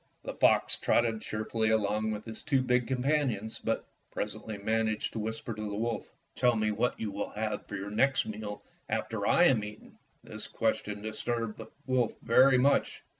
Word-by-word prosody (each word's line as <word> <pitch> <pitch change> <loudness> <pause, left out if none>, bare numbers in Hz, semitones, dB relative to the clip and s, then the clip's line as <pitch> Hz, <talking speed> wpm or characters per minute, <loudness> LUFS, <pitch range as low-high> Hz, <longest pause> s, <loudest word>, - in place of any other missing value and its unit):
The - - -5
fox - - +3
trotted 115 -2 +2
cheerfully 110 +1 -1
along 110 0 +1
with 105 0 -4
his 110 -1 -7
two 135 -4 +2
big 125 -1 +2
companions, 130 -5 0
but - - -1 0.2
presently 110 -2 -4
managed 110 +1 0
to 115 - -3
whisper 110 +2 -4
to 110 0 -4
the 100 - -4
wolf, 115 0 -2 0.2
"Tell 125 -1 +3
me 110 -1 +1
what 115 +4 0
you 110 -2 -2
will 100 +1 -3
have 105 0 -3
for 105 - -5
your 100 +1 -5
next 130 +5 +3
meal 105 -1 -6 0.3
after - - -1
I - - +5
am 115 -6 +5
eaten." 105 0 -10 0.2
This - - -7
question 105 0 -1
disturbed 115 0 -2
the - - -7 0.2
wolf 130 -3 +1
very 130 +3 +5
much. 140 +3 +2
110 Hz, 175 wpm, -30 LUFS, 105-120 Hz, 0.3 s, I